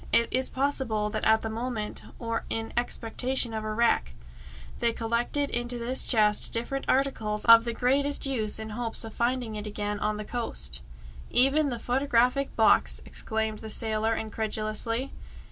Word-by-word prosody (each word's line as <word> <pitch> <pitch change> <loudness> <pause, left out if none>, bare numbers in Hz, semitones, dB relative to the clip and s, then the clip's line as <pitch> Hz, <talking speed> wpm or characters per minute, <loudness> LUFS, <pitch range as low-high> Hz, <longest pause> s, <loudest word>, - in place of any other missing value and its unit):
It 235 - +3
is 260 +1 +1
possible 255 -6 -1
that 215 - -3
at 220 0 +4
the 220 - -4
moment, 225 -2 -3 0.2
or 230 -1 -3
in 225 0 -3
expectation 240 +1 +1
of 220 -1 -3
a 215 - -3
wreck, 215 - +1 0.6
they 235 -1 +1
collected 235 +5 -1
into 240 +1 -1
this 240 +2 0
chest 210 -3 +3
different 255 +4 -2
articles 220 -6 0
of 230 0 +8
the 235 - -2
greatest 280 +5 +1
use 225 -6 -1
in 220 0 -6
hopes 230 +1 -2
of 225 -1 -7
finding 240 -2 -1
it 210 0 -5
again 205 0 -3
on 210 0 -1
the 210 - -6
coast 240 +1 -1 0.3
" - - -15 0.2
"Even 275 +4 +4
the 240 - -3
photographic 250 +2 +1
box!" 220 - +3
exclaimed 220 -1 -3
the 220 - -8
sailor 220 +1 0
incredulously. 220 +3 -3
230 Hz, 160 wpm, -27 LUFS, 220-250 Hz, 0.6 s, of